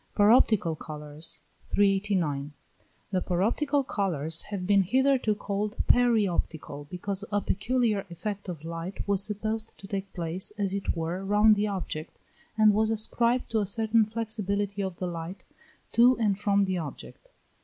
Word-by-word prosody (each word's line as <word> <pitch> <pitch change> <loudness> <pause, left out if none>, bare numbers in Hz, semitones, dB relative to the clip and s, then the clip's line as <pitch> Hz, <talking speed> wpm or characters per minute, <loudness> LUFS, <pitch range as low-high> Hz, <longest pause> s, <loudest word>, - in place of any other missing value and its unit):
PAROPTICAL 205 -6 +4
COLOURS. 150 +1 -8 0.3
389. 190 -8 +1 0.6
The 185 -2 +1
paroptical 260 +11 +1
colours 165 -5 0
have 200 -3 -4
been 200 +1 +4
hitherto 255 +2 +2
called 205 +1 -3
peri 240 -4 +4
optical, 155 -5 -4
because 195 +2 -4
a 205 - +2
peculiar 215 0 0
effect 200 +3 -5
of 165 -4 -6
light 170 +4 -5
was 200 -1 +2
supposed 215 +2 -3
to - - -12
take 195 0 -4
place 175 +1 -3
as 200 -2 0
it 200 -3 -2
were 170 +4 -3
round 210 +2 +5
the 210 +1 0
object, 180 -5 -5 0.4
and 215 -1 +6
was 220 +1 +2
ascribed 235 +3 +2
to 225 - +2
a 205 - -1
certain 220 +2 +2
flexibility 205 -2 -2
of 190 -3 -4
the 185 - -3
light 170 +2 -6 0.5
to 245 +2 +5
and 210 -4 +1
from 200 -1 +2
the 185 -2 -1
object. 165 - -9
200 Hz, 150 wpm, -28 LUFS, 180-215 Hz, 0.6 s, and